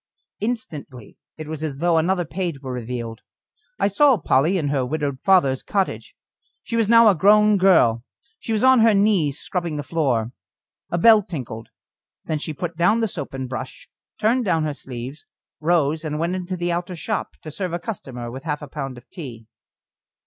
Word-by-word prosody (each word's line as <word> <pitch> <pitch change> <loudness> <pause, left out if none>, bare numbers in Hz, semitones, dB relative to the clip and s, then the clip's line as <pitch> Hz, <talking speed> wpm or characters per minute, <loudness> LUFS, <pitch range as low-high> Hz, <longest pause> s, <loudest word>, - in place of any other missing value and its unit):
Instantly 165 - -5 0.2
it 155 -1 -7
was 155 -1 -6
as 150 -4 -3
though 170 +1 +2
another 175 +2 +1
page 170 -2 -3
were 130 -2 -6
revealed. 120 -1 -5 0.6
I - - +2
saw 265 +6 +4
Polly 160 +2 +2
in 150 -5 -1
her 140 -2 +1
widowed 140 0 -2
father's 155 -9 +3
cottage. 195 -2 -2 0.5
She 230 - -4
was 225 -2 +1
now 230 0 +7
a 210 - +7
grown 210 +4 +5
girl; 120 -12 +4 0.4
she 225 - -5
was 220 0 0
on 260 -1 +6
her 225 -1 +5
knees 195 -9 +2
scrubbing 175 -4 -3
the 145 - -3
floor. 130 -8 0 0.6
A 175 - -1
bell 220 +4 +7
tinkled. 125 - -7 0.6
Then 155 -2 -2
she 155 - -4
put 170 +3 -5
down 180 +7 +3
the 225 - +2
soap 145 -8 -6
and 130 -1 -4
brush, 130 - -7 0.3
turned 240 +4 +2
down 165 -6 +1
her 150 -1 -1
sleeves, 130 +1 -8 0.3
rose 155 -1 +1
and 150 -1 -3
went 170 +3 -1
into 185 0 -4
the 175 0 -1
outer 175 +2 -3
shop 165 - -3
to 155 - -7
serve 185 +3 -4
a 170 - -1
customer 130 - -6
with 130 +2 -8
half 150 -2 -3
a - - -7
pound 135 -2 -6
of 120 - -14
tea. 125 - -9
160 Hz, 185 wpm, -22 LUFS, 135-195 Hz, 0.6 s, now